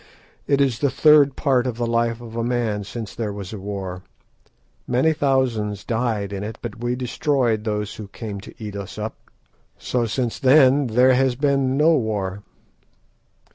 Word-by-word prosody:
It 140 -1 +2
is 135 -5 +1
the 140 - +2
third 150 -1 +5
part 130 -3 +1
of 120 -2 -3
the 120 - -1
life 115 0 0
of 115 -1 -10
a 115 - -1
man 115 -4 -1
since 110 0 -7
there 110 -3 -3
was 100 -1 -7
a 105 - -6
war. 95 -2 -5 0.9
Many 130 +6 +2
thousands 125 -9 0
died 110 -4 -1
in 100 0 -4
it, 110 +1 -6
but 115 -2 -7
we 120 +1 0
destroyed 125 -3 0
those 105 -2 -2
who 105 - -7
came 100 -1 -7
to - - -12
eat 105 -2 -7
us 100 -1 -7
up. 110 +1 -4 0.6
So 120 -2 -1
since 115 +1 -2
then 135 0 +5
there 125 +3 +4
has 130 -1 +2
been 135 -1 +1
no 160 +3 +5
war." 105 -7 -1
115 Hz, 175 wpm, -22 LUFS, 105-130 Hz, 0.9 s, third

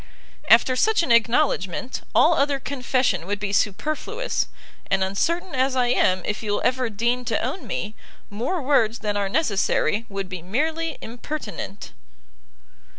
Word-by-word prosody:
After 255 - +6
such 430 - +3
an 285 - 0
acknowledgment, 235 - +1
all - - +6
other 280 0 +1
confession 250 -9 0
would 205 0 -2
be 200 -1 -3
superfluous; 310 - -1 0.4
and 195 -1 +2
uncertain 335 - -1
as 260 0 +1
I 250 -1 +2
am 185 -7 +2
if 210 - -2
you 210 -2 -2
will - - 0
ever 255 -1 +1
deign 235 +4 0
to 225 -1 0
own 280 +10 -4
me, 210 - -3 0.3
more 255 - -3
words 235 -5 +2
than 205 -1 0
are 200 -1 0
necessary 210 - +1
would 195 -1 -4
be 185 -2 -6
merely 310 - -1
impertinent. 225 -5 -6
240 Hz, 150 wpm, -23 LUFS, 205-280 Hz, 0.4 s, After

